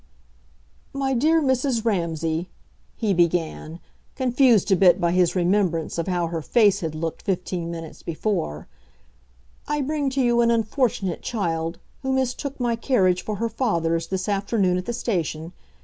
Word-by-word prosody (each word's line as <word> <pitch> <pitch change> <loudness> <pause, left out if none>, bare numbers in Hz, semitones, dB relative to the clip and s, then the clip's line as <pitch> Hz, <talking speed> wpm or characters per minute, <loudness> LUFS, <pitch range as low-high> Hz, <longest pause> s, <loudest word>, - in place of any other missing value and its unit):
"My 270 -1 -1
dear 310 +6 +3
Mrs. 260 -3 +1
Ramsay," 165 -4 -1 0.5
he 215 -4 0
began, 170 -2 0 0.4
confused 250 -5 +3
a - - +7
bit 180 0 +5
by 170 -2 +1
his 180 0 +2
remembrance 175 -3 +1
of 170 - -2
how 175 -2 0
her 165 -1 -3
face 210 +3 +3
had 160 -2 -4
looked 160 +1 -4
fifteen 180 -3 -2
minutes 165 -2 -8
before, 165 - -3 1.0
"I 295 0 0
bring 285 0 -1
to 270 +1 -1
you 240 -1 +3
an 235 - +3
unfortunate 225 -4 0
child, 165 -6 -2 0.2
who 265 - -2
mistook 265 +2 -2
my 240 -2 +1
carriage 190 -7 +2
for 215 - -3
her 230 +3 -1
father's 170 -9 0
this 190 -1 -3
afternoon 200 -2 +1
at 180 - -8
the 240 - -1
station. 170 -8 -3
195 Hz, 150 wpm, -23 LUFS, 170-240 Hz, 1.0 s, a